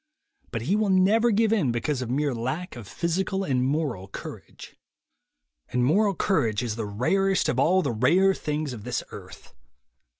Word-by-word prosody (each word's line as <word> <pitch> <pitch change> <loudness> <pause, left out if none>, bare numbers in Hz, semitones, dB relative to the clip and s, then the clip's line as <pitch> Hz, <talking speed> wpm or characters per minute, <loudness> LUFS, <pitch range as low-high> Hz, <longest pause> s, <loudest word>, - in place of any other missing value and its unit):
But 115 -2 -4
he 175 - +1
will 215 -1 +1
never 200 +5 +4
give 220 0 +2
in 175 - +1
because 130 +3 -2
of 125 - -4
mere 140 +2 0
lack 130 +10 -4
of 120 -5 -9
physical 190 - -1
and 130 -7 0
moral 135 - -1
courage. 100 - -10 0.9
And 125 0 +1
moral 200 +7 +3
courage 125 - 0
is 115 -3 -3
the 110 -2 -4
rarest 190 - +1
of 130 - 0
all 180 +7 +3
the 140 - -1
rare 170 - +3
things 150 -5 -3
of 110 -4 -9
this 125 +1 -3
earth. - - -12
150 Hz, 170 wpm, -25 LUFS, 120-190 Hz, 0.9 s, never